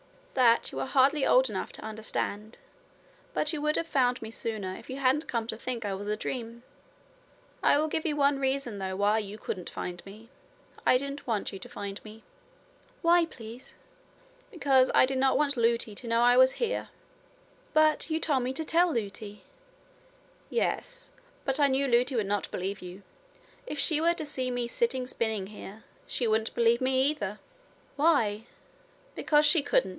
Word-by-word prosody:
'That 240 -3 +4
you - - -5
are - - -2
hardly 275 +2 +3
old - - +5
enough - - -4
to - - -8
understand. 220 0 -4 0.8
But 305 +2 0
you 300 - -3
would 300 +1 +1
have 330 - 0
found 255 -5 +1
me 220 0 -7
sooner 215 -5 -4
if - - -11
you 260 - -4
hadn't 275 +3 +1
come 230 -2 -1
to 220 -1 -4
think 235 -1 -4
I 200 - -1
was 200 +2 -6
a 210 0 -1
dream. 235 0 -5 1.0
I - - +4
will 305 +1 +1
give 310 +1 -2
you 300 - 0
one 280 -1 +2
reason 265 -5 -1
though 190 -1 -3
why 205 +3 +2
you 205 0 -6
couldn't 185 -4 -5
find 175 -1 -6
me. 215 +4 -13 0.6
I 255 - +6
didn't 280 +2 -6
want 215 -4 -1
you 195 - -7
to - - -10
find 200 0 -7
me.' 215 +1 -12 0.8
'Why, 340 0 +5
please?' 240 -3 -11 0.7
'Because 275 - +3
I - - +7
did 265 0 -2
not 265 0 +3
want 290 -1 +1
Lootie 230 -2 +1
to 235 +4 -7
know 230 0 +2
I 245 +1 +5
was 260 0 +6
here.' 475 0 -2 0.8
'But 310 0 +3
you 315 0 0
told 285 -5 +1
me 250 +1 -2
to 315 +4 -2
tell 340 +3 +3
Lootie.' 210 -3 -5 1.1
'Yes. - - -2 0.3
But 270 +1 0
I 285 - +5
knew 275 +1 +1
Lootie 250 +2 +2
would 220 -3 +1
not 200 0 -1
believe 190 +2 -4
you. 180 +2 -10 0.6
If 300 - -5
she 310 +2 +2
were 340 +1 +3
to 320 -3 -5
see 260 -3 -2
me 245 -1 -2
sitting 260 - -1
spinning 220 -6 -2
here, 210 +1 -10 0.2
she 245 - -1
wouldn't 220 0 0
believe 235 0 +3
me, 260 0 +2
either.' 210 -8 -5 0.6
'Why?' 235 -9 +2 0.7
'Because 300 0 +3
she 320 +1 +5
couldn't. 235 -8 +1
250 Hz, 180 wpm, -28 LUFS, 215-285 Hz, 1.1 s, I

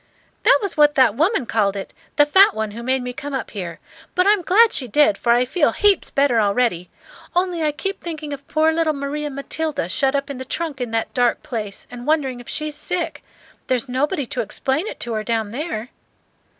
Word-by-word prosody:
"That - - +6
was 400 - -3
what 295 -1 +5
that 260 -5 +5
woman 315 - +1
called 205 -3 +1
it, 195 - -6 0.2
the 290 - +6
fat 380 - +6
one 220 -1 -2
who 230 +3 -7
made 260 +1 0
me 250 0 -4
come 280 +2 -5
up 260 - -4
here. 175 -5 -6 0.4
But 365 - +3
I'm 410 -1 +4
glad 445 +6 +5
she 255 - -1
did, 240 -3 +4
for 235 - 0
I 240 +1 +4
feel 295 +3 +1
heaps 405 -3 +2
better 275 -4 +2
already; 200 -4 +1 0.5
only 355 -2 +1
I 305 -1 +2
keep 390 +6 -4
thinking 310 -3 -5
of 280 0 -9
poor 315 +1 +3
little 320 -1 +1
Maria 290 +1 -3
Matilda 285 - -3
shut 270 +8 +1
up 280 0 -1
in 265 - -7
the - - -4
trunk 290 0 -4
in 245 - -2
that 225 0 -2
dark 245 +1 +1
place, 220 -9 -5
and 245 +2 -8
wondering 275 -5 +1
if 245 - -11
she's 305 -1 -2
sick. 345 +4 -3 0.4
There's 255 0 0
nobody 285 +4 -1
to 245 - -3
explain 265 - -2
to 235 - -5
her 215 -1 -2
down 220 -2 -1
there." 250 -4 -4
275 Hz, 210 wpm, -21 LUFS, 235-310 Hz, 0.5 s, That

